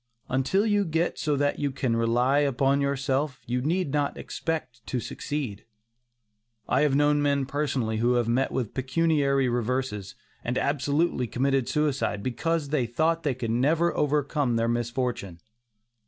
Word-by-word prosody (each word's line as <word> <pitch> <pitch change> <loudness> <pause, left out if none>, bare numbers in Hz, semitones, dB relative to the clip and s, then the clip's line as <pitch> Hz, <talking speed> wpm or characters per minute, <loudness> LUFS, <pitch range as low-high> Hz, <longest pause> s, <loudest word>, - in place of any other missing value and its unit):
Until 135 - +1
you 205 -2 +2
get 165 -1 -1
so 150 -2 +1
that 145 0 0
you 145 - 0
can 130 -3 -1
rely 120 +4 +2
upon 140 0 +2
yourself, 140 0 -1
you 125 +1 -1
need 165 +2 0
not 145 -1 0
expect 130 -8 -4
to 125 - -1
succeed. 130 -4 -4 1.0
I 130 - +2
have 145 -2 +3
known 145 0 +3
men 140 -1 +1
personally 135 -6 -1
who 120 +3 +2
have 120 -2 +1
met 130 +3 +1
with 120 -5 -2
pecuniary 140 0 +1
reverses, 120 -4 -2 0.3
and 125 +1 -2
absolutely 145 -1 +1
committed 135 +1 0
suicide, 145 -9 0
because 150 +4 -1
they 135 -5 +1
thought 160 +7 +1
they 145 -5 -1
could 115 -3 -3
never 150 +8 +2
overcome 145 -3 +1
their 115 0 +1
misfortune. 120 -6 -2
135 Hz, 150 wpm, -26 LUFS, 125-150 Hz, 1.0 s, have